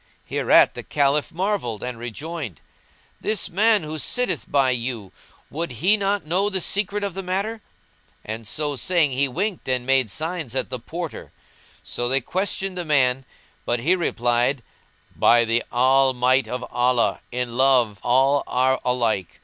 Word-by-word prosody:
Hereat -, -, +4 dB
the -, -, -6 dB
Caliph 145 Hz, 0 st, +1 dB
marvelled 175 Hz, -, -2 dB
and 125 Hz, -2 st, -5 dB
rejoined, 130 Hz, -, -6 dB, 0.6 s
"This 215 Hz, -3 st, -2 dB
man 210 Hz, +2 st, +3 dB
who 155 Hz, 0 st, -5 dB
sitteth 250 Hz, +10 st, -2 dB
by 135 Hz, -2 st, +3 dB
you, 120 Hz, -5 st, -3 dB, 0.4 s
would 160 Hz, -3 st, -3 dB
he 180 Hz, -, +3 dB
not 200 Hz, -2 st, -1 dB
know 185 Hz, +6 st, +1 dB
the 190 Hz, -2 st, 0 dB
secret 205 Hz, +3 st, -1 dB
of 200 Hz, -2 st, -2 dB
the 195 Hz, -, -4 dB
matter?" 200 Hz, +5 st, -3 dB, 0.6 s
and 110 Hz, 0 st, -6 dB
so 145 Hz, +5 st, -1 dB
saying 165 Hz, 0 st, +2 dB
he 135 Hz, +2 st, +1 dB
winked 180 Hz, +5 st, -3 dB
and 125 Hz, -1 st, 0 dB
made 135 Hz, -3 st, +2 dB
signs 155 Hz, -, -3 dB
at 130 Hz, -, -2 dB
the 125 Hz, -, -3 dB
Porter. 170 Hz, +6 st, -7 dB, 0.5 s
So 120 Hz, 0 st, -3 dB
they 135 Hz, +1 st, +3 dB
questioned 190 Hz, +5 st, -2 dB
the -, -, -2 dB
man 135 Hz, -4 st, +2 dB, 0.4 s
but 120 Hz, -1 st, -1 dB
he 170 Hz, +9 st, +3 dB
replied, 120 Hz, -5 st, 0 dB, 0.5 s
"By 120 Hz, 0 st, +5 dB
the 115 Hz, +1 st, +1 dB
All 130 Hz, +2 st, +4 dB
might 130 Hz, +2 st, +2 dB
of 125 Hz, 0 st, -4 dB
Allah, 125 Hz, -1 st, +1 dB
in 125 Hz, -1 st, -3 dB
love 125 Hz, -6 st, +3 dB
all 135 Hz, +3 st, +3 dB
are 130 Hz, +1 st, +1 dB
alike! 115 Hz, -8 st, -1 dB
135 Hz, 155 wpm, -23 LUFS, 125-180 Hz, 0.6 s, By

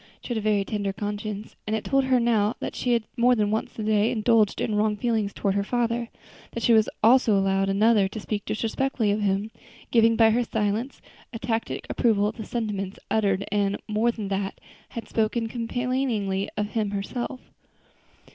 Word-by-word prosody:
She -, -, -9 dB
had 240 Hz, -, -1 dB
a -, -, -5 dB
very 210 Hz, -2 st, +1 dB
tender 205 Hz, -2 st, -2 dB
conscience, 210 Hz, +1 st, -5 dB
and 215 Hz, -, 0 dB
it 220 Hz, -, -3 dB
told 275 Hz, -1 st, +2 dB
her 260 Hz, -1 st, +3 dB
now 225 Hz, -2 st, +2 dB
that -, -, -4 dB
she 245 Hz, -, 0 dB
had 230 Hz, -2 st, +2 dB
more 245 Hz, +1 st, +4 dB
than 210 Hz, -2 st, +1 dB
once 220 Hz, -, -2 dB
during 215 Hz, -, -4 dB
the 215 Hz, -, +1 dB
day 210 Hz, +2 st, +3 dB
indulged 220 Hz, -2 st, +2 dB
in 220 Hz, -, -1 dB
wrong 210 Hz, 0 st, +1 dB
feelings 220 Hz, -3 st, 0 dB
toward 200 Hz, -1 st, -1 dB
her 200 Hz, 0 st, 0 dB
father; 235 Hz, +1 st, -1 dB, 0.4 s
that 235 Hz, -, -4 dB
she 235 Hz, -, +5 dB
had 220 Hz, -1 st, +5 dB, 0.2 s
also 230 Hz, -2 st, +5 dB
allowed 195 Hz, 0 st, +1 dB
another 205 Hz, 0 st, +4 dB
to 210 Hz, +3 st, -7 dB
speak 205 Hz, -1 st, -3 dB
disrespectfully 225 Hz, 0 st, -1 dB
of 210 Hz, +1 st, 0 dB
him, 200 Hz, +2 st, 0 dB, 0.4 s
giving 230 Hz, -1 st, +5 dB
by 225 Hz, 0 st, +5 dB
her 240 Hz, +2 st, +2 dB
silence 220 Hz, +3 st, -2 dB, 0.3 s
a 230 Hz, -, -5 dB
tacit 225 Hz, 0 st, -3 dB
approval 215 Hz, -4 st, +2 dB
of 215 Hz, +2 st, -2 dB
the 220 Hz, -, -6 dB
sentiments 205 Hz, -5 st, -3 dB
uttered, 200 Hz, -3 st, +1 dB
and, 205 Hz, -1 st, +1 dB
more 220 Hz, +2 st, +2 dB
than 215 Hz, -4 st, -6 dB
that, 195 Hz, 0 st, -2 dB, 0.3 s
had 230 Hz, -2 st, -7 dB
spoken 225 Hz, +1 st, 0 dB
complainingly 230 Hz, -4 st, -1 dB
of 210 Hz, 0 st, -1 dB
him 215 Hz, -2 st, -1 dB
herself. 240 Hz, +6 st, -4 dB
215 Hz, 195 wpm, -25 LUFS, 205-235 Hz, 0.4 s, she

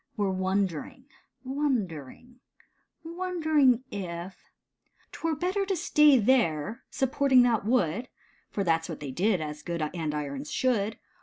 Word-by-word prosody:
Were 200 Hz, -2 st, +1 dB
wondering 190 Hz, -, -2 dB, 0.3 s
— -, -, -47 dB
wondering 245 Hz, -, -3 dB, 0.3 s
— -, -, -46 dB
wondering 315 Hz, -7 st, +2 dB
if 180 Hz, -2 st, -7 dB, 0.6 s
*'Twere 325 Hz, -1 st, -2 dB
better 370 Hz, +6 st, -1 dB
to 385 Hz, -, 0 dB
stay 300 Hz, -4 st, +5 dB
there, 215 Hz, -, +1 dB
supporting 265 Hz, -1 st, +3 dB
that 230 Hz, -4 st, +1 dB
wood, 235 Hz, 0 st, +1 dB, 0.4 s
For 200 Hz, -, -2 dB
that's 165 Hz, -1 st, +1 dB
what 160 Hz, -, -6 dB
they 145 Hz, -3 st, -6 dB
did, 185 Hz, +5 st, +1 dB
as 150 Hz, -1 st, -5 dB
good 170 Hz, +1 st, -4 dB
andirons 150 Hz, -4 st, -4 dB
should. 225 Hz, -4 st, 0 dB
215 Hz, 130 wpm, -28 LUFS, 170-265 Hz, 0.6 s, stay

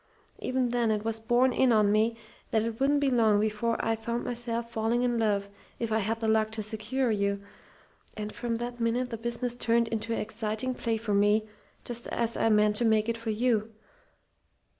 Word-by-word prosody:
Even 255 Hz, -1 st, 0 dB
then, 240 Hz, -1 st, +1 dB
it 215 Hz, 0 st, -1 dB
was 225 Hz, 0 st, -1 dB
borne 240 Hz, +3 st, +2 dB
in 255 Hz, 0 st, +3 dB
on 210 Hz, -2 st, +4 dB
me 220 Hz, +2 st, +2 dB, 0.3 s
that 220 Hz, -1 st, +1 dB
it 230 Hz, 0 st, -4 dB
wouldn't 285 Hz, +2 st, +3 dB
be 275 Hz, -2 st, +2 dB
long 220 Hz, -4 st, +4 dB
before 220 Hz, +2 st, 0 dB
I 225 Hz, -, +2 dB
found 235 Hz, +2 st, -3 dB
myself 235 Hz, -1 st, -3 dB
falling 230 Hz, +2 st, 0 dB
in 240 Hz, -1 st, +1 dB
love, 205 Hz, -3 st, +1 dB, 0.3 s
if 230 Hz, -2 st, -3 dB
I 220 Hz, -, +2 dB
had 225 Hz, +2 st, -1 dB
the 225 Hz, -, 0 dB
luck 220 Hz, 0 st, +3 dB
to 220 Hz, -1 st, -2 dB
secure 220 Hz, +4 st, 0 dB
you. 200 Hz, -1 st, 0 dB, 0.8 s
And 210 Hz, 0 st, -5 dB
from 235 Hz, -1 st, -2 dB
that 240 Hz, +1 st, -4 dB
minute 240 Hz, +2 st, 0 dB
the 230 Hz, -, -3 dB
business 235 Hz, +1 st, -2 dB
turned 235 Hz, -1 st, +1 dB
into 225 Hz, 0 st, -3 dB
an 225 Hz, -, 0 dB
exciting 215 Hz, +3 st, -2 dB
play 230 Hz, -2 st, -1 dB
for 220 Hz, -2 st, -2 dB
me, 205 Hz, +2 st, +3 dB, 0.4 s
just 235 Hz, -1 st, -6 dB
as 230 Hz, -1 st, -1 dB
I 225 Hz, -, +2 dB
meant 210 Hz, -1 st, +3 dB
to 240 Hz, -, +1 dB
make 220 Hz, 0 st, +3 dB
it 230 Hz, -, 0 dB
for 230 Hz, 0 st, -5 dB
you. 225 Hz, -1 st, 0 dB
225 Hz, 205 wpm, -28 LUFS, 215-240 Hz, 0.8 s, on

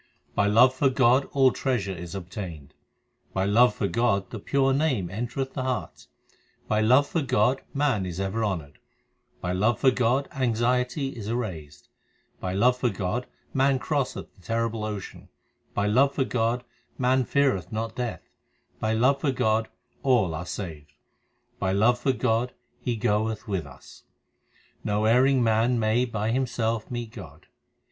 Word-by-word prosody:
By 105 Hz, -, +2 dB
love 125 Hz, +5 st, +6 dB
for 135 Hz, +1 st, +2 dB
God 130 Hz, +1 st, +3 dB
all 135 Hz, -2 st, +4 dB
treasure 120 Hz, -9 st, -1 dB
is 85 Hz, +1 st, -7 dB
obtained, 85 Hz, -6 st, -7 dB, 0.6 s
By 95 Hz, 0 st, 0 dB
love 110 Hz, +3 st, +4 dB
for 100 Hz, -, -1 dB
God 105 Hz, -4 st, 0 dB
the 110 Hz, -, -5 dB
pure 135 Hz, +5 st, +1 dB
Name 130 Hz, -, 0 dB
entereth 120 Hz, +5 st, -3 dB
the 130 Hz, -, -3 dB
heart, 130 Hz, -1 st, -4 dB, 0.6 s
By 105 Hz, 0 st, +1 dB
love 130 Hz, +6 st, +5 dB
for 165 Hz, -, -1 dB
God 130 Hz, 0 st, +2 dB
man 135 Hz, -10 st, 0 dB
is 90 Hz, 0 st, -5 dB
ever 95 Hz, +4 st, -1 dB
honoured, 85 Hz, -9 st, -3 dB, 0.6 s
By 90 Hz, -, -2 dB
love 105 Hz, +5 st, +2 dB
for 130 Hz, -, +5 dB
God 130 Hz, +3 st, +1 dB
anxiety 125 Hz, +2 st, 0 dB
is 115 Hz, -6 st, -7 dB
erased, 85 Hz, -12 st, -5 dB, 0.5 s
By 90 Hz, -, -3 dB
love 120 Hz, +7 st, +3 dB
for 125 Hz, -1 st, +1 dB
God 100 Hz, +4 st, -3 dB, 0.3 s
man 135 Hz, 0 st, +3 dB
crosseth 140 Hz, 0 st, -2 dB
the -, -, -23 dB
terrible 115 Hz, +1 st, -2 dB
ocean, 105 Hz, -3 st, -7 dB, 0.5 s
By 100 Hz, -, +1 dB
love 135 Hz, +7 st, +3 dB
for 135 Hz, -, +2 dB
God 120 Hz, 0 st, 0 dB, 0.3 s
man 130 Hz, +1 st, +2 dB
feareth 130 Hz, -, +1 dB
not 110 Hz, +1 st, -3 dB
Death, 120 Hz, -2 st, -4 dB, 0.5 s
By 110 Hz, 0 st, 0 dB
love 130 Hz, +5 st, +3 dB
for 145 Hz, -, +1 dB
God 110 Hz, -3 st, +1 dB, 0.3 s
all 120 Hz, -11 st, +2 dB
are 85 Hz, +3 st, -5 dB
saved, 80 Hz, -7 st, -7 dB, 0.7 s
By 95 Hz, 0 st, 0 dB
love 115 Hz, +5 st, +3 dB
for 135 Hz, -, +2 dB
God 120 Hz, 0 st, 0 dB, 0.3 s
He 120 Hz, -, -2 dB
goeth 110 Hz, +1 st, -1 dB
with 95 Hz, -7 st, -2 dB
us. 65 Hz, -, -15 dB, 0.8 s
No 105 Hz, +1 st, 0 dB
erring 130 Hz, +3 st, +4 dB
man 115 Hz, +2 st, +2 dB
may 110 Hz, +3 st, +2 dB
by 110 Hz, -2 st, -2 dB
himself 115 Hz, -3 st, -1 dB
meet 120 Hz, -2 st, -5 dB
God. 105 Hz, -6 st, -11 dB
115 Hz, 155 wpm, -26 LUFS, 100-130 Hz, 0.8 s, love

